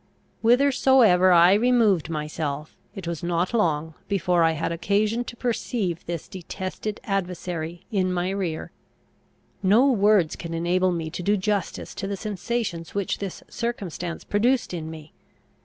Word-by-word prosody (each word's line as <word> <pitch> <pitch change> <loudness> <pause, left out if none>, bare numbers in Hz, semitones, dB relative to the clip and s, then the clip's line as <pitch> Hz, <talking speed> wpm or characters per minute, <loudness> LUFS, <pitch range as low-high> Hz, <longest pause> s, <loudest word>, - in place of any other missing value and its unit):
Whithersoever 245 -6 +5
I 175 +1 +7
removed 215 -7 +3
myself 150 -1 -4 0.2
it 190 -4 -7
was 170 -1 -3
not 175 +3 -1
long 160 -7 +1
before 180 -3 +1
I 165 0 +3
had 160 +1 -2
occasion 210 +7 +1
to 240 - -8
perceive 225 -7 -2
this 170 -2 -4
detested 190 +3 -5
adversary 175 -4 -3
in 185 -3 +1
my 180 +1 -1
rear. 185 -5 -3 0.9
No 220 +8 +5
words 205 -7 +3
can 165 -1 -6
enable 180 +2 +1
me 165 -2 -3
to 175 - -5
do 205 +4 +2
justice 200 -1 -2
to 195 - -4
the 200 0 -3
sensations 205 -4 -3
which 200 -2 -1
this 195 -3 -6
circumstance 190 -8 -4
produced 240 +2 +1
in 160 -2 -4
me. 155 -1 -10
185 Hz, 140 wpm, -25 LUFS, 170-210 Hz, 0.9 s, I